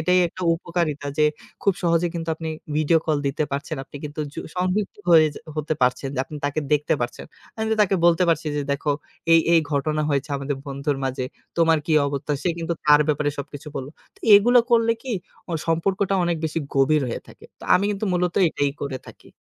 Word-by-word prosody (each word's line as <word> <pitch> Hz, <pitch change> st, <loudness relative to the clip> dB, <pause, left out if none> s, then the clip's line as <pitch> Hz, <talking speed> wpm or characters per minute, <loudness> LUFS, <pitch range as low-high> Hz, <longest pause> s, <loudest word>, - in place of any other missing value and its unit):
এটাই 180 Hz, 0 st, +3 dB
একটা 185 Hz, -, -9 dB
উপকারিতা 165 Hz, -4 st, -2 dB
যে, 150 Hz, -, +5 dB, 0.4 s
খুব 200 Hz, -, +4 dB
সহজে 170 Hz, 0 st, +2 dB
কিন্তু 165 Hz, -1 st, -4 dB
আপনি 160 Hz, 0 st, -6 dB, 0.3 s
ভিডিও 155 Hz, +2 st, +3 dB
কল 155 Hz, -2 st, +2 dB
দিতে 145 Hz, +2 st, 0 dB
পারছেন। 140 Hz, +2 st, -3 dB
আপনি 145 Hz, -, -11 dB
কিন্তু 150 Hz, +1 st, -5 dB
যু -, -, -4 dB, 0.2 s
সংযুক্ত 185 Hz, +3 st, -1 dB
হয়ে 160 Hz, -2 st, +7 dB
যে -, -, -8 dB, 0.2 s
হতে 155 Hz, +1 st, -1 dB
পারছেন 125 Hz, +2 st, +1 dB
যে -, -, -4 dB
আপনি 150 Hz, -, -9 dB
তাকে 145 Hz, +2 st, 0 dB
দেখতে 150 Hz, +1 st, +2 dB
পারছেন। 120 Hz, 0 st, -4 dB, 0.3 s
আমি 220 Hz, -, -1 dB
তো -, -, +1 dB
তাকে 195 Hz, -1 st, +2 dB
বলতে 170 Hz, +1 st, +4 dB
পারছি 165 Hz, -1 st, +1 dB
যে 145 Hz, -, 0 dB
"দেখো 145 Hz, +1 st, 0 dB, 0.4 s
এই, 165 Hz, -, +8 dB
এই 165 Hz, -, +6 dB
ঘটনা 155 Hz, +2 st, 0 dB
হয়েছে 140 Hz, +1 st, -1 dB
আমাদের 140 Hz, 0 st, -3 dB
বন্ধুর 140 Hz, +1 st, -2 dB
মাঝে। 130 Hz, -1 st, -2 dB, 0.3 s
তোমার 165 Hz, -1 st, +4 dB
কি 160 Hz, -, 0 dB
অবস্থা?" 140 Hz, +1 st, -2 dB
সে -, -, +1 dB
কিন্তু 165 Hz, 0 st, -2 dB
তার 150 Hz, 0 st, +6 dB
ব্যাপারে 145 Hz, 0 st, +1 dB
সবকিছু 145 Hz, +1 st, -7 dB
বলল। 135 Hz, +1 st, -4 dB, 0.3 s
তো -, -, -23 dB
এগুলা 240 Hz, +4 st, +6 dB
করলে 230 Hz, -1 st, +4 dB
কি 260 Hz, -3 st, -4 dB, 0.4 s
অ -, -, -3 dB
সম্পর্কটা 190 Hz, +4 st, +1 dB
অনেক 170 Hz, -1 st, 0 dB
বেশি 160 Hz, +1 st, -1 dB, 0.2 s
গভীর 140 Hz, +2 st, +3 dB
হয়ে -, -, -4 dB
থাকে। -, -, -16 dB, 0.2 s
তো -, -, -10 dB
আমি 195 Hz, -, +3 dB
কিন্তু 205 Hz, +1 st, -2 dB
মূলত 180 Hz, 0 st, 0 dB
এটাই 145 Hz, -2 st, 0 dB
করে 140 Hz, -2 st, -3 dB
থাকি। -, -, -15 dB
155 Hz, 205 wpm, -23 LUFS, 145-175 Hz, 0.4 s, এই